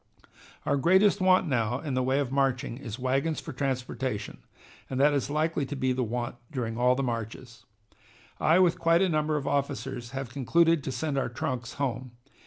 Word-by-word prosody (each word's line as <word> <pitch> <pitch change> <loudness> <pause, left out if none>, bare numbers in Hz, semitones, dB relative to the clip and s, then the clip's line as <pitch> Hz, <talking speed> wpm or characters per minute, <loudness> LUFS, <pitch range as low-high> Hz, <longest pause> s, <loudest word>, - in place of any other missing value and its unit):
"Our - - +2
greatest 190 +7 +4
want 185 -1 +4
now 125 -2 0
in 145 -3 -4
the 130 - +1
way 130 +2 +1
of 140 -3 -1
marching 135 -4 0
is 115 -5 -6
wagons 135 +5 0
for 160 - -8
transportation, 130 -3 -3 0.5
and 130 - -3
that 145 +2 +5
is 140 -2 -1
likely 155 0 0
to 145 - -4
be 130 -1 0
the 130 - -1
want 120 +1 -3
during 115 -4 -3
all 125 +2 +3
the 135 - -1
marches. 120 0 -5 0.7
I, 160 +3 +4
with 180 -2 +3
quite 165 +2 +4
a 190 - +2
number 155 -1 +1
of 140 - -4
officers, 130 -3 -2
have 135 -1 -5
concluded 165 +4 +2
to - - -2
send 145 0 -1
our 130 - -1
trunks 125 -2 -4
home. 130 -3 -3
135 Hz, 190 wpm, -28 LUFS, 125-150 Hz, 0.7 s, that